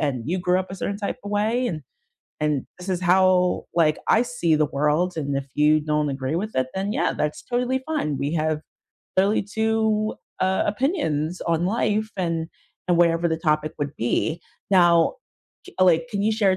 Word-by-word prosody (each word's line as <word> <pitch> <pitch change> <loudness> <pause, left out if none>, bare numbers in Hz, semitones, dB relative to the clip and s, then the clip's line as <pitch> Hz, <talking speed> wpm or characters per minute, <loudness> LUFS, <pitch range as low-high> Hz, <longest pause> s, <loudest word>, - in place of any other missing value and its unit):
and 140 -5 -1
you 180 +4 -1
grew 180 0 +2
up 185 - -8
a - - -5
certain 200 +2 -3
type 200 - -3
of 205 - -5
way, 220 +5 +1
and 155 -4 -5 0.6
and 150 -3 0
this 180 - -9
is 185 -2 -1
how, 180 0 +3
like, 155 -3 +3
I 225 - +5
see 240 -10 0
the 150 - +2
world, 150 +6 0
and 140 -3 -2
if 135 - -6
you 150 +1 +4
don't 150 0 0
agree 135 +2 -2
with 215 +5 -3
it, 130 - +2
then 195 +2 -2
yeah, - - +1
that's 150 0 -2
totally 250 +2 -1
fine, 150 - -1
we 145 +4 -2
have 155 -1 0 0.6
clearly 200 +3 +3
2, 220 +1 0 0.3
uh, 190 0 +2
opinions 205 - -1
on 170 0 +1
life, 215 +1 0
and 165 -3 -1 0.4
and 175 - +4
whatever 170 0 +3
the 160 - 0
topic 155 -1 0
would 145 -1 -3
be." 155 +7 -1 0.3
Now, 175 - +5 0.5
j 375 - -12
uh, 185 - +7
like, 175 +6 +3
can 200 -3 -2
you 215 - +2
share 210 -3 +3
a 185 - 0
175 Hz, 195 wpm, -23 LUFS, 155-205 Hz, 0.6 s, uh